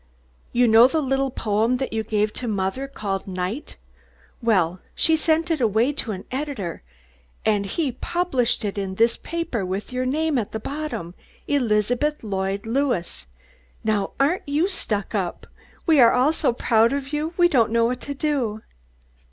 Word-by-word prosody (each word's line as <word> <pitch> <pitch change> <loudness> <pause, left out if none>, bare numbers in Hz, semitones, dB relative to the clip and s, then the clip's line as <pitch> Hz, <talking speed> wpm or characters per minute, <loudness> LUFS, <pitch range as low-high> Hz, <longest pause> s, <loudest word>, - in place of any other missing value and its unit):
You 245 0 +3
know 225 +2 +8
that 315 +4 0
little 270 0 0
poem 225 +1 +1
that 265 -2 -3
you 220 - 0
gave 210 0 0
to 245 - -4
mothah, 205 +6 -1
called 200 -8 -4
'Night?' 185 +8 -4 0.6
Well, 185 -6 +2 0.2
she 320 - +4
sent 320 +2 +1
it 315 -4 0
away 230 +5 +2
to 250 -6 -2
an 190 -1 -5
editah, 260 - -3 0.7
and 205 -2 +2
he 320 - -1
has 255 -4 -3
published 265 -11 0
it 200 0 -2
in 190 -1 -3
this 230 +3 +3
papah 335 -10 -3
with 190 +6 -4
yo' 255 0 0
name 295 +2 +1
at 215 - -5
the 220 - -2
bottom, 280 - -5 0.3
Elizabeth 245 +3 +1
Lloyd 195 -1 -2
Lewis! 235 - -1 0.6
Now 215 -2 0
aren't 290 +3 +1
you 310 +7 +2
stuck 225 - -3
up? 190 -5 -2 0.4
We 320 -4 +5
are 235 -2 +8
all 260 +5 +3
so 305 -5 +1
proud 230 0 +3
of 280 +1 -4
you 310 +3 -2
we 350 -1 +6
don't 245 -10 +3
know 230 +1 +3
what 245 +1 -1
to 285 - -5
do." 265 -8 -1
240 Hz, 170 wpm, -23 LUFS, 210-285 Hz, 0.7 s, know